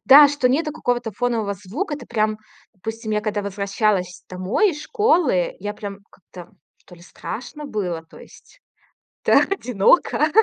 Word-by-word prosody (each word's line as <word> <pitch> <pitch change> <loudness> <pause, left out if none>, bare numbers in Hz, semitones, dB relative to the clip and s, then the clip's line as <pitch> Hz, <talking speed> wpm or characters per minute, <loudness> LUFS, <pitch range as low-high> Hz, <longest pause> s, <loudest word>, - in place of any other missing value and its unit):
да, 285 +2 +9
что 280 -3 +1
нету 305 +3 +1
какого-то 240 -6 -1
фонового 225 -2 -1
звука. 230 - -4
Это 270 -5 -10
прям 215 -2 0 0.4
Допустим, 225 +3 -6
я 210 - +1
когда 210 -1 -2
возвращалась 200 -2 -1
домой 185 - +1
из 300 -3 -7
школы, 360 - +2
я 205 +2 -4
прям 200 -1 -7
как-то, 180 -1 -14 0.2
что 180 - -17
ли, 170 - -18
страшно 250 - -7
было, 180 -8 -3
то - - -16
есть, - - -17 0.6
да, - - +6
одиноко. 290 - +2
215 Hz, 150 wpm, -22 LUFS, 195-285 Hz, 0.6 s, да